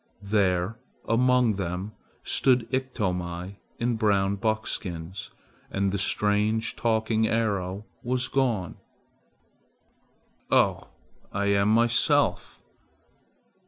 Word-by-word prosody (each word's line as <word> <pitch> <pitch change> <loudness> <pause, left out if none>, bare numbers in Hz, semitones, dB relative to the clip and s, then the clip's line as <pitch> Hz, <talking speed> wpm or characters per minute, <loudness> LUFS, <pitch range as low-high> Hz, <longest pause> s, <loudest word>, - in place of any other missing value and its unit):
There 100 0 +1 0.3
among 125 -2 +3
them 90 +2 -3 0.3
stood 125 -3 +2
Iktomi 95 -8 -3 0.2
in 120 -1 0
brown 100 -2 +2
buckskins, 95 -4 -3 0.4
and 100 0 0
the 100 - -2
strange 105 +3 +1
talking 110 -1 +1
arrow 100 -3 -1 0.2
was 125 +1 -1
gone. 120 -11 0 1.7
"Oh! - - +2 0.4
I 100 0 -1
am 100 +1 +3
myself. 115 +1 +2
105 Hz, 85 wpm, -26 LUFS, 95-115 Hz, 1.7 s, among